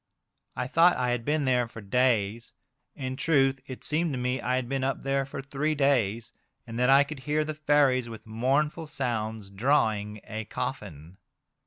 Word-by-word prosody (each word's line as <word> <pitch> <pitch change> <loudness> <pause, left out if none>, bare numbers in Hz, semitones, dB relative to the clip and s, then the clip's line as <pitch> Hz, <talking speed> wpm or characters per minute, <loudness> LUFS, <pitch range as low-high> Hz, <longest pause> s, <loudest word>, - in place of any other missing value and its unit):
I - - -2
thought 165 +7 +4
I 125 -1 0
had 120 -1 -1
been 150 +2 0
there 125 -2 +2
for 115 - -10
days; 115 0 0 0.4
in 130 -2 -4
truth, 135 -4 +2
it 130 - -8
seemed 155 0 0
to - - -2
me 125 +1 -1
I 125 - 0
had 130 -2 -1
been 135 +1 -2
up 135 0 -2
there 135 0 0
for 135 0 -6
three 145 +3 -1
days, 120 -6 +1 0.3
and 115 0 -6
that 125 +1 +3
I 135 +1 +7
could 145 0 -8
hear 150 +3 0
the 155 - -3
fairies 145 -5 +2
with 115 -1 -10
mournful 140 +8 0
sounds 110 -8 -3
drawing 105 -2 +1
a 110 -1 -6
coffin. 95 - -6
130 Hz, 180 wpm, -27 LUFS, 115-140 Hz, 0.4 s, I